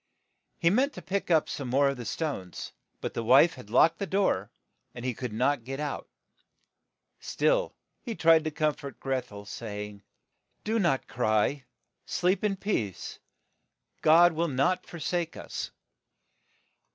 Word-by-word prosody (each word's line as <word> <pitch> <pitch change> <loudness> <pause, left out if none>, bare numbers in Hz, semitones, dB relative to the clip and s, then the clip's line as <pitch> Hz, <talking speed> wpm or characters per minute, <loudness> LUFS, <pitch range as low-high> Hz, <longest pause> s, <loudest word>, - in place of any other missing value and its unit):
,^ - - -53 0.5
He 170 - +3
meant 265 +7 +2
to 180 - -8
pick 190 +4 -2
up 160 -3 +4
some 140 - -4
more 140 +3 +3
of 140 - -3
the 120 - -6
small - - -2 0.2
stones; 90 -6 -8 0.3
but - - -4
the 115 - -3
wife 135 +8 +6
had 125 -5 -12
locked 160 +8 +4
the 200 - -2
door, 190 - +1 0.5
and 120 - -7
he 130 - 0
could 125 0 -5
not 125 +3 +1
get 135 +3 -5
PH; 150 - -2
out. 145 - -5 1.1
Still - - +1 0.3
he 235 -4 -5
tried 165 -3 +5
to - - +1
corn 155 0 +1
fort 140 -4 -9
Greth 130 -3 -2
el, 100 0 -9
say 105 -1 -6
ing, 100 -1 -15 0.6
Do 225 +1 0
not 170 -9 +1
cry; 120 +4 +1 0.4
sleep 180 +3 +1
in 205 -2 +1
peace; 120 - -3 0.8
God 170 +2 +6
will 165 +2 0
not 155 +6 +1
for 170 - -9
sake 170 +1 -2
us." - - -5
145 Hz, 170 wpm, -28 LUFS, 120-175 Hz, 1.1 s, wife